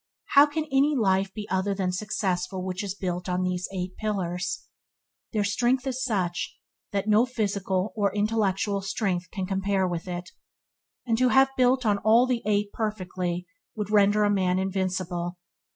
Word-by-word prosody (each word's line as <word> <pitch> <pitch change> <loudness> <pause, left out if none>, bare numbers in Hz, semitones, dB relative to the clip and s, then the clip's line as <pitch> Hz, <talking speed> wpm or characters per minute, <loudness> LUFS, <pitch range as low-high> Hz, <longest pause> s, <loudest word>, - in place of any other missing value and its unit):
How 285 +1 +8
can 305 +1 -2
any 280 +2 +3
life 195 -4 +2
be 210 0 -6
other 190 +1 +1
than 185 -2 0
successful 185 -1 -2
which 185 +2 -3
is 195 -1 -4
built 180 -2 -3
on 180 0 0
these 180 0 -1
Eight 185 -1 -4
Pillars? 185 -4 -2 0.7
Their 215 -3 +1
strength 240 +6 +1
is 260 -1 -2
such 185 -8 -1 0.3
that 200 0 -1
no 215 +3 +4
physical 200 -4 -1
or 200 -3 +1
intellectual 205 -2 +1
strength 190 -2 -2
can 190 -4 -3
compare 195 0 0
with 175 0 -4
it; 175 -1 -5 0.7
and 230 -2 +1
to 255 0 +4
have 270 +1 +4
built 255 0 +3
all 220 +3 +4
the 250 -2 0
eight 205 -1 +1
perfectly 185 -5 -3 0.3
would 210 -2 -4
render 210 0 +4
a 205 - +3
man 185 -2 +2
invincible. 185 -2 -2
200 Hz, 160 wpm, -26 LUFS, 185-220 Hz, 0.7 s, How